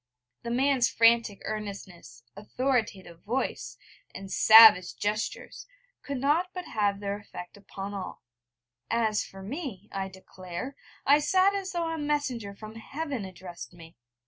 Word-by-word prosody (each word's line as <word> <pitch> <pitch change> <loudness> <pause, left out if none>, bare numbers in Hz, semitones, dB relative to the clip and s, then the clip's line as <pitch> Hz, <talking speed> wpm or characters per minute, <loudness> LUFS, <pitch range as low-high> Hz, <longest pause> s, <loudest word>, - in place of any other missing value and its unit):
The 235 - -6
man's 260 0 +2
frantic 230 -2 +3
earnestness, 195 - -7
authoritative 210 -5 -2
voice, 140 - -3 0.4
and 190 0 -8
savage 220 -3 +8
gestures, 210 +1 -3 0.3
could 280 -1 -5
not 300 +7 +1
but 365 -1 -5
have 205 -2 0
their 200 0 -3
effect 180 -3 -10
upon 200 0 -8
all; 195 -2 -7 0.7
as 225 -2 +1
for 195 0 -11
me, 225 - -6
I 195 -1 -3
declare, 190 +6 -8 0.3
I 285 +2 +6
sat 370 +6 +3
as 390 -1 -4
though 340 -1 -1
a 325 - -4
messenger 275 -9 -2
from 215 +2 -10
Heaven 275 -1 -5
addressed 180 -2 -10
me. 165 -1 -14
215 Hz, 135 wpm, -28 LUFS, 195-270 Hz, 0.7 s, savage